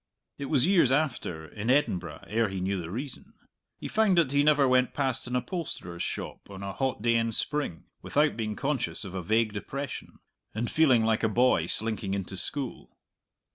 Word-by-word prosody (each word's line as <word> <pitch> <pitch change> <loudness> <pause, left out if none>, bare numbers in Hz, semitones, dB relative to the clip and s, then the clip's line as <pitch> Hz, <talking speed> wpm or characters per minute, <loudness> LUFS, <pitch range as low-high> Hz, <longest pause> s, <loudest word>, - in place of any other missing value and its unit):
It 140 - -3
was 140 -2 +3
years 175 -9 +4
after, 130 - 0
in 105 +7 -5
Edinburgh, 90 - +1
ere 110 +1 +1
he 95 -1 -4
knew 95 0 -1
the 80 - -7
reason; 125 +7 -7 0.4
he - - -6
found 215 -4 +3
that 160 -6 +4
he 140 0 +4
never 145 -2 +5
went 130 0 +3
past 130 -3 -1
an 125 - -2
upholsterer's 125 - -4
shop, - - -5
on 100 -1 -8
a 100 0 -4
hot 130 -2 -2
day 115 -1 +4
in 115 0 +2
spring, 140 - -1 0.2
without 150 +1 +2
being 110 -2 -3
conscious 135 -5 -2
of 95 - -7
a 95 - -3
vague 110 +4 +1
depression, 135 +6 -5 0.4
and 115 +2 -2
feeling 130 -8 +4
like 110 -1 +2
a 110 - +2
boy 115 -7 +3
slinking 110 -2 -1
into 95 -1 -4
school. 135 +7 -5
120 Hz, 185 wpm, -28 LUFS, 100-140 Hz, 0.4 s, never